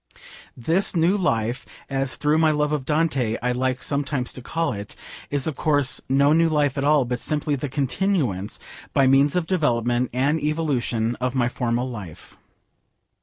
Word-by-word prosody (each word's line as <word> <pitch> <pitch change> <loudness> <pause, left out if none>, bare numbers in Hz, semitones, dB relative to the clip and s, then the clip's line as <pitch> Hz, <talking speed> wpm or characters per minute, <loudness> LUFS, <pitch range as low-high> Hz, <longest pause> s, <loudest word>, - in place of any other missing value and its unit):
This 165 - +1
New 170 +4 +3
Life, 120 - -1 0.2
as 135 -1 -1
through 150 +1 +1
my 160 -1 +4
love 150 -1 +1
of 150 -3 -2
Dante 140 -7 0
I 125 - +1
like 130 0 -1
sometimes 140 -2 -2
to 130 - -8
call 165 +2 -2
it, 100 -1 -7 0.3
is 140 -2 -1
of 160 - -2
course 145 -4 +2
no 140 +2 +4
new 165 +1 +3
life 145 -3 +1
at 135 - -2
all, 145 -2 +3
but 125 0 -3
simply 150 -1 -1
the 140 +1 -4
continuance, 135 - -1 0.4
by 135 - +4
means 135 +3 +4
of 180 -2 +1
development, 125 -8 0
and 140 +6 +1
evolution, 135 -7 -1
of 125 +1 -2
my 120 -2 +2
former 120 -1 -1
life. 105 -11 -8
135 Hz, 170 wpm, -23 LUFS, 125-150 Hz, 0.4 s, my